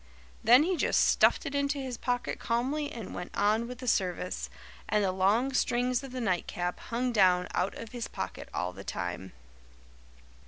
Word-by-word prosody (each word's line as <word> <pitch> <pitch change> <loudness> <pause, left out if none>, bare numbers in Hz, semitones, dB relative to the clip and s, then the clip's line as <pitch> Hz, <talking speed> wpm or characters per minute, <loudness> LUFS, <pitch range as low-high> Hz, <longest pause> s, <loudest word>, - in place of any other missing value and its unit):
Then 245 +6 +7
he 360 +2 0
just - - +2
stuffed - - +4
it 285 - -4
into 280 0 0
his 260 -3 -4
pocket 245 +1 -2
calmly 275 +6 -1
and 225 -5 -7
went 180 - -7
on 215 +3 +2
with 250 0 -7
the 255 0 -8
service, 180 -4 -1 0.4
and 210 -1 +2
the 190 - +2
long 205 +8 +2
strings 250 0 +1
of 270 - -8
the 255 - -4
nightcap 180 -4 -1
hung 245 +2 -2
down 185 -5 +4
out 185 +2 0
of 230 - -8
his 240 -3 -4
pocket - - -6
all 90 0 -2
the 95 +1 -9
time." 90 0 -4
230 Hz, 180 wpm, -30 LUFS, 185-255 Hz, 0.4 s, Then